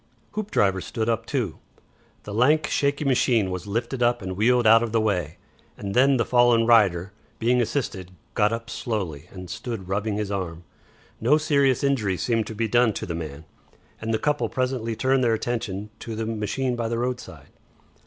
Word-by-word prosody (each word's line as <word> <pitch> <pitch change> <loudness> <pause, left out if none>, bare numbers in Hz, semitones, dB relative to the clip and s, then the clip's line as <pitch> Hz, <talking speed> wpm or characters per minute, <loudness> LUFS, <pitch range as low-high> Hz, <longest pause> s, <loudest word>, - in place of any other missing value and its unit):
Hoopdriver 105 - 0
stood 110 +3 -3
up, 115 0 -1
too. 120 - -2 0.6
The 105 - -7
lank, 150 +8 +3
shaky 145 0 0
machine 120 -6 +2
was 90 +2 -5
lifted 120 +5 -2
up 120 0 +3
and 95 0 -4
wheeled 120 +4 +3
out 115 +1 +7
of 115 -1 -3
the 115 - +3
way, 90 -8 -1 0.4
and 100 -1 -5
then 135 +3 +4
the 115 - +1
fallen 120 -2 +4
rider, 100 -6 +4 0.3
being 125 +2 +2
assisted, 115 -6 -2 0.2
got 105 +1 +2
up 115 0 -4
slowly 95 - -4
and 90 -1 -9
stood 95 +2 -6
rubbing 105 +2 -1
his 105 -1 -2
arm. 90 -4 -4 0.6
No 130 +7 +4
serious 140 -4 +2
injury 110 -9 +1
seemed 115 0 0
to 110 - -6
be 115 +1 0
done 120 0 +3
to - - -4
the 85 - -4
man, 80 -2 -6 0.6
and 110 0 -2
the 110 - +2
couple 150 +5 0
presently 125 -3 -2
turned 130 +2 +2
their 115 -2 +3
attention 105 -3 -3
to 115 - -6
the 110 +1 -3
machine 115 +4 -2
by 120 -1 -2
the 115 0 -2
roadside. 125 +1 -5
115 Hz, 185 wpm, -24 LUFS, 100-125 Hz, 0.6 s, out